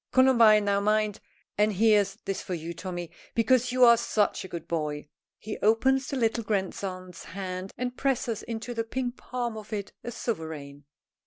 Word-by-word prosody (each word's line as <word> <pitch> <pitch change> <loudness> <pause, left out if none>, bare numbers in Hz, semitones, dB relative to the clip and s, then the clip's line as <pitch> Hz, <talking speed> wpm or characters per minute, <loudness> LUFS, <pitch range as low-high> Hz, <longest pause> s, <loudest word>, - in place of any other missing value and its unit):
Columbine, 235 -5 +6
now 200 0 +2
mind. 210 0 +1 0.4
And 210 0 +4
here's 205 -1 +3
this 195 0 -2
for 180 - -4
you, 165 +1 -5
Tommy, 175 -1 -6 0.2
because 250 +2 +3
you 255 0 +6
are 235 -1 +8
such 215 -2 0
a - - -7
good 170 -2 -7
boy." 150 -3 -3 0.3
He 215 - -6
opens 260 +5 +3
the 275 - -3
little 230 -1 +1
grandson's 190 -3 -3
hand 185 +1 -5
and 250 0 -3
presses 245 -5 0
into 235 +1 -5
the 230 -1 -1
pink 245 +1 -3
palm 240 -2 -4
of 215 0 -9
it 205 -2 -4
a - - -4
sovereign. 160 - -5
215 Hz, 170 wpm, -28 LUFS, 185-235 Hz, 0.4 s, are